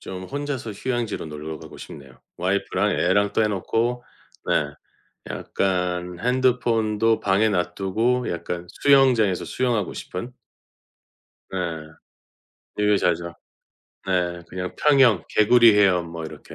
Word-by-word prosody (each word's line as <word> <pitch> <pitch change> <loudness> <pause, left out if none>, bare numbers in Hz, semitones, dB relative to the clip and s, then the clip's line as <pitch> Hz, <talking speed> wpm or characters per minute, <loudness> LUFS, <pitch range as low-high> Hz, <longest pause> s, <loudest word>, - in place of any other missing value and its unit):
좀 95 0 -7
혼자서 140 -2 -4
휴양지로 120 -3 -3
놀러 75 +1 -7
가고 80 -1 -12
싶네요. 65 -3 -12 0.2
와이프랑 100 +2 0
애랑 100 +2 +2
떼어 110 0 +2
놓고 115 +5 -1 0.4
네. 70 -1 0 0.6
약간 90 -2 -2
핸드폰도 115 -3 +1
방에 100 +3 +2
놔두고 100 +6 0
약간 85 +1 -4
수영장에서 125 -7 +3
수영하고 120 -7 -1
싶은. 120 +8 -7 1.2
예 - - -3 1.3
유유자적. 85 -4 +1 0.7
네 90 -2 -1
그냥 90 0 -5
평영, 135 - +4
개구리 115 +1 +5
헤엄 90 -4 +3
뭐 85 -1 -6
이렇게 80 - -10
100 Hz, 250 characters per minute, -23 LUFS, 90-120 Hz, 1.3 s, 개구리